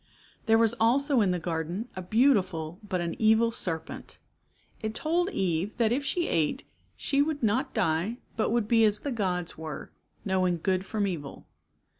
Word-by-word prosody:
There 225 Hz, 0 st, +6 dB
was 225 Hz, 0 st, +4 dB
also 260 Hz, +3 st, +3 dB
in 200 Hz, -, +3 dB
the 180 Hz, -, +1 dB
garden 170 Hz, +5 st, -3 dB
a 185 Hz, -, -4 dB
beautiful 185 Hz, -, +1 dB
but 195 Hz, -4 st, -2 dB
an 170 Hz, -1 st, -3 dB
evil 220 Hz, +1 st, +4 dB
serpent. 165 Hz, -7 st, -5 dB, 0.6 s
It 220 Hz, 0 st, -3 dB
told 345 Hz, +4 st, +1 dB
Eve 185 Hz, -, -1 dB
that 230 Hz, -2 st, +2 dB
if 270 Hz, +4 st, 0 dB
she 340 Hz, +5 st, 0 dB
ate 165 Hz, -, 0 dB, 0.3 s
she 280 Hz, -1 st, +1 dB
would 290 Hz, -2 st, -1 dB
not 225 Hz, +4 st, +1 dB
die 190 Hz, +2 st, 0 dB, 0.2 s
but 220 Hz, -, +1 dB
would 235 Hz, -3 st, +1 dB
be 225 Hz, 0 st, +4 dB
as 210 Hz, -1 st, +3 dB
the 285 Hz, -, -3 dB
gods 180 Hz, -8 st, -2 dB
were, 160 Hz, -2 st, -7 dB, 0.3 s
knowing 185 Hz, -2 st, +1 dB
good 185 Hz, +3 st, -1 dB
from 210 Hz, -2 st, -1 dB
evil. 155 Hz, -8 st, -5 dB
210 Hz, 170 wpm, -28 LUFS, 180-235 Hz, 0.6 s, There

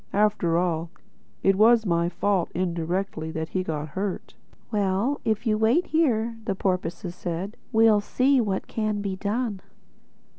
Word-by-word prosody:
After 205 Hz, -5 st, +2 dB
all, 170 Hz, -2 st, 0 dB, 0.5 s
it 195 Hz, -, +4 dB
was 225 Hz, +2 st, +5 dB
my 170 Hz, -2 st, +1 dB
fault, 190 Hz, -1 st, 0 dB
indirectly, 175 Hz, -1 st, -2 dB
that 160 Hz, 0 st, -3 dB
he 185 Hz, -, -1 dB
got 155 Hz, -3 st, -4 dB
hurt." 190 Hz, +6 st, -4 dB, 0.4 s
"Well, 205 Hz, +6 st, 0 dB
if 220 Hz, +1 st, 0 dB
you 215 Hz, -2 st, +1 dB
wait 235 Hz, +11 st, +3 dB
here," 235 Hz, -8 st, +1 dB
said 225 Hz, -, -19 dB
the 195 Hz, -, 0 dB
porpoises, 180 Hz, 0 st, -3 dB, 0.2 s
"we'll 220 Hz, -2 st, +5 dB
see 260 Hz, +5 st, +2 dB
what 195 Hz, -4 st, -2 dB
can 215 Hz, -2 st, -2 dB
be 195 Hz, -2 st, -2 dB
done." 205 Hz, +1 st, -2 dB
200 Hz, 145 wpm, -25 LUFS, 175-220 Hz, 0.5 s, was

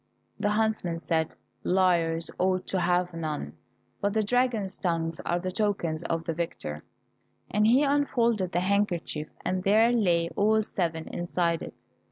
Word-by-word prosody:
The 205 Hz, -, +1 dB
huntsman 210 Hz, -5 st, 0 dB
said, 160 Hz, -1 st, -1 dB, 0.3 s
"Liars 170 Hz, -3 st, +2 dB
ought 185 Hz, 0 st, +1 dB
to 190 Hz, -, 0 dB
have 180 Hz, 0 st, +1 dB
none, 155 Hz, -, -4 dB, 0.5 s
but 200 Hz, 0 st, +1 dB
the 220 Hz, -, +3 dB
dragon's 225 Hz, -4 st, 0 dB
tongues 165 Hz, -3 st, -1 dB
are 175 Hz, -, +2 dB
the 185 Hz, +1 st, -3 dB
tokens 185 Hz, -6 st, 0 dB
of 165 Hz, -1 st, -1 dB
the 165 Hz, -, -2 dB
victor," 115 Hz, -, -4 dB, 0.7 s
and 210 Hz, +1 st, +3 dB
he 255 Hz, +5 st, +5 dB
unfolded 235 Hz, -9 st, +1 dB
the 175 Hz, -, +1 dB
handkerchief, 185 Hz, -5 st, 0 dB, 0.2 s
and 185 Hz, 0 st, 0 dB
there 215 Hz, +5 st, +4 dB
lay 175 Hz, -8 st, +2 dB
all 215 Hz, +1 st, +3 dB
seven 165 Hz, -5 st, -2 dB
inside 170 Hz, -1 st, -1 dB
it. -, -, -8 dB
180 Hz, 150 wpm, -27 LUFS, 165-210 Hz, 0.7 s, he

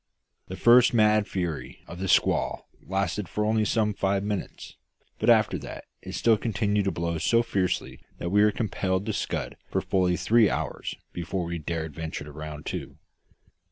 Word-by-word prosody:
The 95 Hz, -, -6 dB
first 120 Hz, +3 st, +6 dB
mad 105 Hz, -1 st, +4 dB
fury 85 Hz, -5 st, -4 dB
of 85 Hz, -, -9 dB
the 95 Hz, -, -2 dB
squall -, -, +2 dB
lasted 95 Hz, 0 st, -2 dB
for 105 Hz, -, -1 dB
only 110 Hz, 0 st, +2 dB
some 105 Hz, -1 st, +1 dB
five 100 Hz, 0 st, 0 dB
minutes; 105 Hz, -2 st, -5 dB, 0.4 s
but -, -, +2 dB
after -, -, +4 dB
that -, -, -8 dB, 0.2 s
it -, -, -8 dB
still 115 Hz, -2 st, +3 dB
continued 105 Hz, -2 st, 0 dB
to 95 Hz, -, +1 dB
blow 85 Hz, -1 st, -2 dB
so 115 Hz, +8 st, +3 dB
fiercely 95 Hz, -5 st, -1 dB, 0.2 s
that 85 Hz, -, -4 dB
we 105 Hz, +1 st, +5 dB
were 105 Hz, -, +6 dB
compelled 95 Hz, -3 st, -1 dB
to 110 Hz, -, -2 dB
scud -, -, -3 dB
for -, -, 0 dB
fully 90 Hz, -2 st, +1 dB
three 110 Hz, +5 st, +4 dB
hours -, -, -3 dB, 0.2 s
before 85 Hz, +2 st, -3 dB
we 85 Hz, 0 st, -4 dB
dared 80 Hz, 0 st, -4 dB
venture 80 Hz, 0 st, -5 dB
to 75 Hz, -, -10 dB
round 75 Hz, 0 st, -8 dB
to. -, -, -5 dB
95 Hz, 175 wpm, -26 LUFS, 85-105 Hz, 0.4 s, first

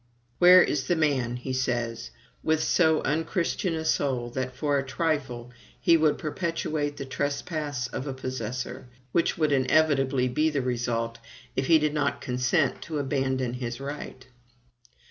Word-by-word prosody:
"Where 180 Hz, +1 st, +9 dB
is 135 Hz, -3 st, -1 dB
the 175 Hz, -, +2 dB
man," 135 Hz, -7 st, +1 dB
he 125 Hz, +1 st, -4 dB
says, 120 Hz, -2 st, -2 dB, 0.3 s
"with 160 Hz, 0 st, +1 dB
so 160 Hz, -3 st, +3 dB
unchristian 165 Hz, +3 st, -1 dB
a 160 Hz, 0 st, -4 dB
soul 130 Hz, -6 st, 0 dB
that, 130 Hz, 0 st, -3 dB
for 145 Hz, +1 st, +1 dB
a -, -, -2 dB
trifle, 135 Hz, -5 st, -2 dB, 0.3 s
he 170 Hz, -, +5 dB
would 155 Hz, -2 st, +3 dB
perpetuate 155 Hz, -2 st, -2 dB
the 140 Hz, -, -5 dB
trespass 145 Hz, 0 st, -2 dB
of 130 Hz, +3 st, -5 dB
a 135 Hz, -, -3 dB
possessor, 130 Hz, -1 st, -5 dB, 0.2 s
which 170 Hz, -, +1 dB
would 155 Hz, -3 st, +2 dB
inevitably 135 Hz, -2 st, +3 dB
be 150 Hz, +6 st, +1 dB
the 145 Hz, -4 st, -1 dB
result 115 Hz, -2 st, -2 dB, 0.4 s
if 130 Hz, -, 0 dB
he 165 Hz, -, +7 dB
did 150 Hz, -1 st, 0 dB
not 145 Hz, -2 st, 0 dB
consent 125 Hz, +3 st, 0 dB
to 160 Hz, -2 st, -4 dB
abandon 130 Hz, -3 st, -1 dB
his 120 Hz, -1 st, -4 dB
right?" 140 Hz, -2 st, -7 dB
140 Hz, 150 wpm, -27 LUFS, 125-155 Hz, 0.4 s, Where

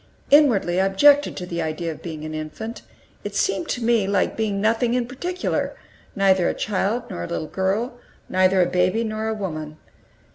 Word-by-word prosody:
Inwardly, 225 Hz, -11 st, +4 dB
I 190 Hz, -, +3 dB
objected 285 Hz, +9 st, +4 dB
to 180 Hz, -, -4 dB
the 170 Hz, -1 st, -3 dB
idea 160 Hz, +1 st, -3 dB
of 155 Hz, -, -10 dB
being 155 Hz, -3 st, -6 dB
an 155 Hz, -, -5 dB
infant; 155 Hz, +10 st, -6 dB, 0.4 s
it -, -, -6 dB
seemed 340 Hz, -4 st, 0 dB
to 245 Hz, -, -2 dB
me 225 Hz, -4 st, +2 dB
like 200 Hz, -1 st, +1 dB
being 210 Hz, -3 st, -1 dB
nothing 230 Hz, +3 st, +1 dB
in 250 Hz, -1 st, +1 dB
particular 355 Hz, +9 st, -3 dB, 0.4 s
neither 190 Hz, -2 st, +3 dB
a -, -, -2 dB
child 210 Hz, +4 st, -1 dB
nor 85 Hz, -, -4 dB
a -, -, -4 dB
little 155 Hz, -, -3 dB
girl, 205 Hz, +8 st, -2 dB, 0.3 s
neither 185 Hz, 0 st, +3 dB
a -, -, +2 dB
baby 185 Hz, +5 st, +1 dB
nor 220 Hz, 0 st, -3 dB
a 220 Hz, -, -1 dB
woman. 155 Hz, -6 st, -5 dB
195 Hz, 185 wpm, -23 LUFS, 175-230 Hz, 0.4 s, Inwardly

